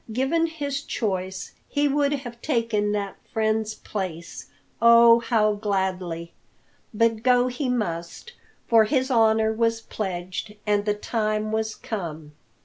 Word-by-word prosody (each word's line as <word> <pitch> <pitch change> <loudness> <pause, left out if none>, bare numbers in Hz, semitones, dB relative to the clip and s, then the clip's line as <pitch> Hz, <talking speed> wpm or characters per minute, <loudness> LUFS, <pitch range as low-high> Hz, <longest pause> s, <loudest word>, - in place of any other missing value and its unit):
Given 270 +8 +1
his 285 -4 -4
choice, 190 -6 -3 0.2
he 290 0 +1
would 285 0 +1
have 245 -5 -5
taken 230 -7 0
that 200 -1 -3
friend's 220 0 0
place 175 -5 -6 0.3
oh, 235 0 +7
how 220 -2 +2
gladly! 190 -5 -2 0.6
But 225 0 +1
go 250 0 +3
he 255 +2 -3
must, 205 - -3 0.3
for 225 -2 +5
his 260 +2 0
honour 220 -2 +3
was 230 0 +1
pledged, 185 -1 -5
and 205 -1 +1
the 210 -1 +1
time 215 0 -1
was 220 0 -1
come! 165 - -6
220 Hz, 130 wpm, -24 LUFS, 205-245 Hz, 0.6 s, oh